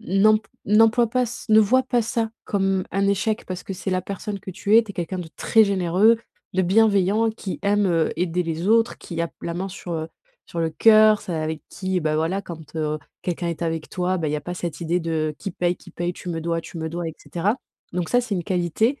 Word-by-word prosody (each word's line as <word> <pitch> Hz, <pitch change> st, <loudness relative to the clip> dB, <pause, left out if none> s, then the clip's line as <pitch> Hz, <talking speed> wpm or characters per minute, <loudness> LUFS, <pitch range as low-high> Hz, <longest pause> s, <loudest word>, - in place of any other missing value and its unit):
n'emp 210 Hz, +4 st, +4 dB, 0.3 s
n'emploie 225 Hz, +3 st, +5 dB
pas, 250 Hz, +2 st, +1 dB
ç 240 Hz, -, -7 dB
ne 215 Hz, 0 st, +7 dB
vois 230 Hz, +5 st, +5 dB
pas 250 Hz, -2 st, +1 dB
ça 225 Hz, 0 st, -1 dB
comme 195 Hz, -2 st, 0 dB
un 195 Hz, +1 st, +2 dB
échec 210 Hz, +3 st, 0 dB
parce 185 Hz, 0 st, -5 dB
que -, -, -5 dB
c'est 190 Hz, +1 st, -4 dB
la 185 Hz, 0 st, 0 dB
personne 200 Hz, +2 st, -5 dB
que 190 Hz, -, -7 dB
tu 205 Hz, +3 st, +3 dB
es, 230 Hz, -, +7 dB
tu 215 Hz, -, -9 dB
es -, -, -9 dB
quelqu'un 180 Hz, +2 st, -3 dB
de 165 Hz, -2 st, -6 dB
très 225 Hz, -1 st, +4 dB
généreux, 200 Hz, +3 st, +3 dB, 0.3 s
de 190 Hz, 0 st, +2 dB
bienveillant, 210 Hz, +2 st, +3 dB
qui 210 Hz, -3 st, -6 dB
aime, 205 Hz, 0 st, +2 dB
heu, 165 Hz, -3 st, +2 dB
aider 180 Hz, +1 st, 0 dB
les 165 Hz, +3 st, -2 dB
autres, 230 Hz, +1 st, +3 dB
qui 170 Hz, -2 st, -6 dB
a 170 Hz, -, +1 dB
p -, -, -31 dB
la 170 Hz, -, -3 dB
main 190 Hz, +3 st, -3 dB
sur, 180 Hz, -2 st, -7 dB
heu, 160 Hz, 0 st, -3 dB, 0.4 s
sur 170 Hz, -, -4 dB
le 165 Hz, -1 st, 0 dB
cœur, 215 Hz, +4 st, +6 dB
celle 190 Hz, -5 st, -4 dB
avec 155 Hz, 0 st, -3 dB
qui, 190 Hz, -1 st, -2 dB
bah, 155 Hz, -1 st, 0 dB
voilà, 165 Hz, +5 st, 0 dB
quand, 160 Hz, -3 st, -10 dB
heu, 155 Hz, -1 st, -1 dB, 0.2 s
quelqu'un 175 Hz, -1 st, -2 dB
est 170 Hz, 0 st, -4 dB
avec 165 Hz, -1 st, -2 dB
toi, 185 Hz, 0 st, -1 dB
bah, 160 Hz, -4 st, -1 dB
il -, -, -2 dB
y 150 Hz, -, +1 dB
a -, -, -4 dB
pas 175 Hz, +4 st, -5 dB
cette 175 Hz, 0 st, -5 dB
idée 170 Hz, +2 st, 0 dB
de: 160 Hz, -2 st, -1 dB
«Qui 195 Hz, -, -4 dB
paye 175 Hz, 0 st, 0 dB
qui -, -, -15 dB
paye?», 175 Hz, +1 st, -2 dB
«Tu -, -, -8 dB
me 165 Hz, -2 st, -2 dB
dois 165 Hz, +1 st, -1 dB
tu 165 Hz, -, -9 dB
me 160 Hz, 0 st, -3 dB
dois» 170 Hz, +1 st, -3 dB
et 160 Hz, -, -8 dB
cetera, 195 Hz, +8 st, -1 dB, 0.4 s
donc 175 Hz, -2 st, -2 dB
ça, 245 Hz, -, +4 dB
c'est 235 Hz, -4 st, -3 dB
une 175 Hz, -, -1 dB
qualité. 185 Hz, -, 0 dB
185 Hz, 250 wpm, -23 LUFS, 170-210 Hz, 0.4 s, ne